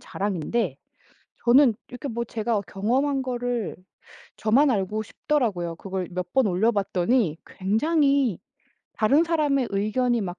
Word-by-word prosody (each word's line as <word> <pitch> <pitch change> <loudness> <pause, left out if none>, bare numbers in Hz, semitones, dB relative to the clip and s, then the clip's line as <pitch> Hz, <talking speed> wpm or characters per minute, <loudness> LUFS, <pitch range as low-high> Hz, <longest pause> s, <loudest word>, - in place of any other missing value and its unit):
자랑인데 195 - -2 0.7
저는 250 0 +6
이렇게 250 +3 -7
뭐 235 0 -3
제가 225 0 -1
어 - - -1
경험한 265 +8 0
거를 245 -3 -3 0.6
저만 260 +7 +3
알고 210 0 -1
싶더라고요. 205 - -1
그걸 190 -1 -4
몇 180 0 -5
번 265 -2 +4
올려 200 +5 +2
봤더니 195 -2 +1
굉장히 275 - +1 0.6
다른 275 +9 +3
사람의 295 -6 +1
의견이 230 +5 +1
막 180 -2 -5
230 Hz, 275 characters per minute, -25 LUFS, 195-265 Hz, 0.7 s, 저는